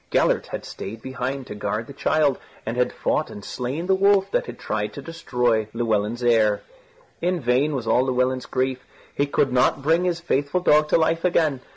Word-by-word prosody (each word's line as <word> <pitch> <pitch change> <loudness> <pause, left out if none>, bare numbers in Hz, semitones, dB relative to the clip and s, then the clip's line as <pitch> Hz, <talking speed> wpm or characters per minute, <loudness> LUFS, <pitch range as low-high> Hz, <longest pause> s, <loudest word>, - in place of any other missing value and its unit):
Gellert - - +2
had - - -6
stayed 110 +3 -8
behind 130 +1 -4
to - - -7
guard 105 +2 -3
the 140 - -11
child 145 -1 +1 0.3
and 110 - -3
had 125 0 +1
fought - - -1
and 105 - -9
slain 135 +7 -4
the 190 - +3
wolf 195 0 +3
that - - 0
had 120 - -7
tried 105 0 -3
to 140 - -7
destroy 125 -9 0
Llewelyn's 115 0 0
heir. 110 -3 +3 0.6
In 180 +1 0
vain 135 +3 +1
was 125 -4 -3
all 125 +3 +3
Llewelyn's 130 0 0
grief; 130 0 -1 0.3
he 140 - 0
could 135 -2 +1
not 130 +2 +2
bring 165 +4 +3
his 175 -2 0
faithful 155 +1 0
dog 150 -3 +4
to - - +4
life 165 0 +1
again. 155 -7 +2
130 Hz, 195 wpm, -23 LUFS, 120-160 Hz, 0.6 s, dog